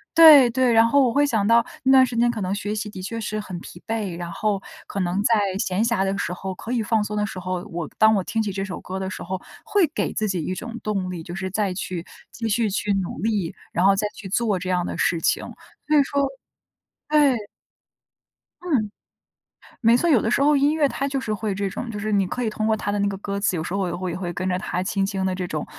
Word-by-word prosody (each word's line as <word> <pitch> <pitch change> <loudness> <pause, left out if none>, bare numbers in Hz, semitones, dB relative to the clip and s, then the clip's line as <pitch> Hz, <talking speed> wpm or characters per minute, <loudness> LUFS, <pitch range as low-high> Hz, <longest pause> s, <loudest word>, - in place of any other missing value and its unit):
对 305 -6 +9
对， 250 0 +2
然 225 0 +6
后 280 +5 +4
我 235 - -1
会 285 +2 +4
想 220 -7 +1
到 230 +1 +5 0.2
那 265 0 +5
段 260 -1 +7
时 245 -2 -5
间 240 +1 +4
可 225 -3 -3
能 185 0 -1
学 205 +1 -3
习 210 0 -3
的 190 -3 -8
确 230 +5 -4
是 215 0 -3
很 190 -4 -6
疲 175 - -11
惫， 210 -6 -2
然 175 -1 -5
后 200 +2 -1 0.2
可 200 - -5
能 185 +2 0
在 225 0 +4 0.2
闲 185 0 0
暇 230 -3 +2
的 195 0 -1
时 180 - -2
候， 190 +1 -5
可 230 +6 -5
以 235 -3 +1
放 220 +1 +1
松 210 - -4
的 210 0 +1
时 200 -3 -6
候， 185 0 -3
我 170 -1 -4
当 220 0 +6
我 195 - +1
听 225 -1 -1
起 205 - -2
这 195 0 -3
首 185 - -6
歌 190 +1 -5
的 190 0 -3
时 - - -6
候， 185 +1 -4 0.2
会 400 -5 +2
给 - - 0
自 215 - -1
己 185 -4 -1
一 185 - -2
种 235 +5 -6
动 195 -4 -1
力， 175 -3 -5
就 175 +2 -7
是 190 -1 -3
再 200 -1 0
去 180 -2 -5 0.3
继 230 -1 -4
续 220 0 +1
去 205 +1 -1
努 185 -6 -3
力， 205 -5 -1 0.2
然 175 - +1
后 195 0 +6
再 210 +2 0
去 200 - -9
做 205 0 0
这 185 - -5
样 180 -1 +1
的 - - -4
事 170 -2 +1
情， - - +2 0.5
所 305 - +3
以 285 - +6
说 280 0 0 0.8
对。 280 -8 +3 1.2
嗯。 265 -13 0 0.9
没 230 0 +5
错， 345 - +1
有 275 -7 +5
的 - - 0
时 275 - +2
候 295 +1 +5
音 285 +2 +3
乐 300 -2 +3
它 275 0 -2
就 275 -1 -1
是 230 - -4
会 210 -1 -2
这 200 0 -2
种， 240 +5 -5
就 210 - -5
是 215 +1 -2
你 200 -2 +3
可 250 - -3
以 225 - 0
通 215 0 -3
过 220 0 +3
它 205 - -2
的 205 - -1
那 200 - +2
个 195 -1 -3
歌 200 0 -4
词， 200 -2 +1
有 160 - -2
时 170 - -5
候 195 -1 0
也 175 - -3
会 185 0 -3
也 170 - -4
会 180 -2 -4
跟 180 +2 -3
着 180 - 0
它 180 -1 -3
轻 195 +1 0
轻 195 -1 -2
地 190 - 0
这 180 -1 -3
种 155 -3 -3
205 Hz, 290 characters per minute, -23 LUFS, 185-230 Hz, 1.2 s, 对